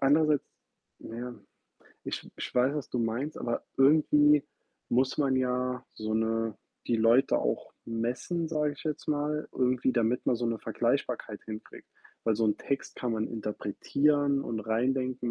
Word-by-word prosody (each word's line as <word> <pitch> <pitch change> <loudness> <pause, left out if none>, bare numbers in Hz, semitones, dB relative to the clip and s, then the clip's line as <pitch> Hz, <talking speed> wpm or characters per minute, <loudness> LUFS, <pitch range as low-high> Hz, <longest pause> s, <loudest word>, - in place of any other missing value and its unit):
andererseits 150 +1 +4 0.6
na 115 - -8
ja, 125 0 -5 0.7
ich - - -5
ich - - -6
weiß, 125 +3 +3
was 150 -3 -4
du 125 - -1
meinst, 120 +6 -1
aber 120 -1 -2
irgendwie 150 +1 +5 0.4
muss 130 +2 +2
man 135 -3 +3
ja, 125 0 0
so 110 0 -3
'ne 110 0 0 0.3
die 120 - +2
Leute 115 +5 +4
auch - - -2
messen, 125 +9 -2
sage 150 -2 0
ich - - -13
jetzt 155 -2 -3
mal, 150 0 0
irgendwie, 125 0 +2
damit 120 0 +1
man 120 - +3
so 120 - -1
'ne 115 -1 -1
Vergleichbarkeit - - -1
hinkriegt. 110 0 -9 0.4
Weil 110 -2 +2
so 115 - +2
'n 105 - +2
Text 140 - -3
kann 120 -2 -2
man 110 -1 0
interpretieren 140 +7 +1
und 110 -4 -3
reindenken, 125 +3 0
125 Hz, 155 wpm, -29 LUFS, 115-145 Hz, 0.7 s, irgendwie